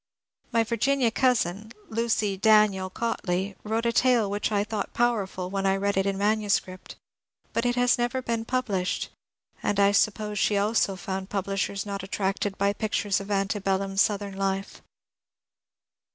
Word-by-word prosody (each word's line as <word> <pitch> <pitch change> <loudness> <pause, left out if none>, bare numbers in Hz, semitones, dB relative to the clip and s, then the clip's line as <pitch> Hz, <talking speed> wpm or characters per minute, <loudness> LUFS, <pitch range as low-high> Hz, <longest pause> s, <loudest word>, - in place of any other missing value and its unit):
My 230 -1 +3
Virginia 235 +2 +1
cousin, 220 -5 0 0.2
Lucy 220 -3 0
(Daniel) 200 -2 +4
Cautley, 195 -3 -2
wrote 225 +2 -1
a 235 - +1
tale 240 -6 +3
which 205 +2 -1
I 205 -1 +2
thought 210 -1 -4
powerful 200 -6 0
when 195 0 0
I 195 - +3
read 200 +1 0
it 195 +1 +1
in 195 -1 -1
manuscript; 205 -3 -1 0.6
but 230 +1 +1
it 245 - +1
has 245 -1 +3
never 240 +2 0
been 230 -3 -2
published, 225 -7 -1 0.5
and 205 -1 0
I 200 0 +5
suppose 210 0 +1
she 205 - +2
also 205 -1 +1
found 190 +1 -5
publish 195 0 -1
ers 200 0 -4
not 200 -1 -4
attracted 195 +1 -2
by 200 0 +2
pictures 205 -2 0
of 195 +1 -8
ante 200 +1 0
bellum 195 0 -1
Southern 200 0 +1
life. 195 0 -2
205 Hz, 155 wpm, -26 LUFS, 195-225 Hz, 0.6 s, I